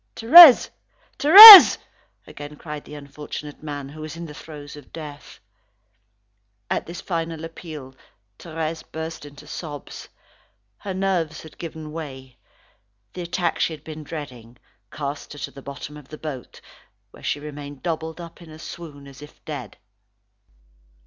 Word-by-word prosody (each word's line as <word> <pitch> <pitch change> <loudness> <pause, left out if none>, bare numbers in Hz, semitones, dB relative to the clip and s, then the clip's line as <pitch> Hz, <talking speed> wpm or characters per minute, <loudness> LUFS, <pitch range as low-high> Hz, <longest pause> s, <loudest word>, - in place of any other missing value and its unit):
"Thérèse! 275 +4 +7 0.5
Thérèse!" 400 +6 +11 0.5
again 145 0 -12
cried 150 -1 -10
the 150 - -12
unfortunate 145 +1 -11
man 145 -2 -8
who 155 +2 -13
was 155 +1 -9
in 170 - -9
the 150 - -12
throes 150 -2 -13
of 145 - -17
death. 150 -3 -12 1.3
At - - -3
this 170 +2 -10
final 165 -3 -6
appeal, 155 -5 -12 0.5
Thérèse 160 -1 -7
burst 160 -1 -8
into 145 +1 -16
sobs. 150 -1 -10 0.7
Her 195 -2 -8
nerves 180 -5 -4
had 160 - -17
given 160 -2 -10
way. 135 -5 -11 0.7
The 180 - -8
attack 175 0 -4
she 165 - -2
had 150 -2 -13
been 155 -1 -11
dreading, 125 -7 -11 0.3
cast 145 0 -8
her 145 - -13
to - - -16
the 140 - -14
bottom 140 +2 -11
of 145 -3 -16
the 155 - -12
boat, 145 -6 -10 0.5
where - - -18
she - - -4
remained 145 -1 -11
doubled 160 -1 -6
up 170 0 -13
in 170 - -15
a 155 - -14
swoon, 160 -1 -12
and - - -15
as 135 0 -16
if 150 - -17
dead. - - -9
155 Hz, 150 wpm, -21 LUFS, 145-165 Hz, 1.3 s, Thérèse